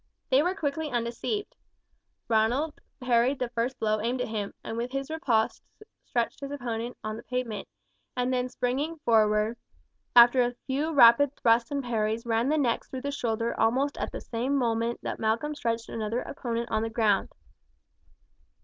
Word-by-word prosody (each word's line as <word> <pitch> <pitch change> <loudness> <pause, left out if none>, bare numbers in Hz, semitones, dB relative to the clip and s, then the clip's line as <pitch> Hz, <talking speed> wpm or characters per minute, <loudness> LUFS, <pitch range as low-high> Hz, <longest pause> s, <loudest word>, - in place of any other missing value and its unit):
They 265 +2 +6
were 360 +4 0
quickly 310 -3 -2
undeceived. 240 - -3 0.7
Ronald 240 +8 +1 0.2
parried 250 +1 +2
the 250 -2 -2
first 240 +2 -2
blow 215 -1 +1
aimed 240 +3 -1
at 250 - -2
him, 210 -2 -3
and - - -5
with 240 +2 -3
his 275 +2 -3
riposte 245 -9 +1 0.4
stretched 235 -1 -1
his 275 0 -6
opponent 240 -4 -4
on 215 0 -4
the - - -8
pavement, 240 -5 -4 0.5
and 250 +1 +1
then 250 0 0
springing 270 +7 -2
forward, 215 0 +3 0.6
after 240 +1 +8
a 245 0 0
few 285 +4 -1
rapid 275 0 +6
thrusts 230 0 +3
and 280 -1 -2
parries 225 -1 -1
ran 230 +2 +1
the 310 - +2
next 245 -6 0
through 260 - -5
the 285 - -2
shoulder 230 -4 -1
almost 265 +5 +2
at - - -3
the - - -6
same 250 +4 -2
moment 235 -2 0
that - - -4
Malcolm 225 +7 0
stretched 230 -5 -2
another 225 +2 -2
opponent 235 -3 -4
on 220 - +1
the 225 - -1
ground. 220 -3 +2
240 Hz, 165 wpm, -28 LUFS, 225-270 Hz, 0.7 s, after